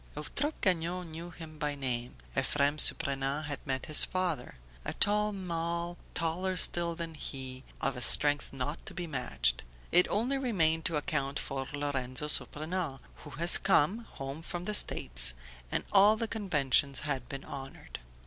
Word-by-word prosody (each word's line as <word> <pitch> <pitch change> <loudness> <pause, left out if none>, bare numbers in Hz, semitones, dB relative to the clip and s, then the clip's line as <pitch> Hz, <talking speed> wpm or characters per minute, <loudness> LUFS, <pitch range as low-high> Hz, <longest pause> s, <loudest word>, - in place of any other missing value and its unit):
Eutrope 285 - -3
Gagnon 175 -1 -1
knew 165 +2 -8
him 160 -2 -11
by 150 -2 -2
name, 125 -3 -4 0.2
Ephrem 145 +1 +1
Surprenant 140 -1 +3
had 145 -1 -4
met 130 -1 -2
his 155 - +7
father: 180 -8 -3 0.3
"A - - -2
tall 210 +1 +4
man, 170 -2 -4 0.2
taller 180 +3 -2
still 170 -1 +1
than 165 -1 -6
he, 130 -3 -5 0.2
of 135 - -1
a 125 - -7
strength 145 +3 +2
not 135 +3 -5
to - - -8
be 175 - -4
matched." 125 - -1 0.3
it 180 - +4
only 250 +6 -1
remained 165 -11 +1
to 165 - +2
account 140 -2 -2
for 135 -1 -4
Lorenzo 145 -1 -2
Surprenant, 155 -1 0 0.2
"who - - -12
has 170 +6 +3
come, 190 +4 +2
home 135 +3 -7
from 175 +1 -6
the 210 - -3
States" 60 - +6 0.4
and - - -1
all 205 +2 +5
the 230 - -3
conventions 150 - +1
had 135 -5 -4
been 140 0 -7
honoured. 135 -1 -9
155 Hz, 160 wpm, -30 LUFS, 135-180 Hz, 0.4 s, his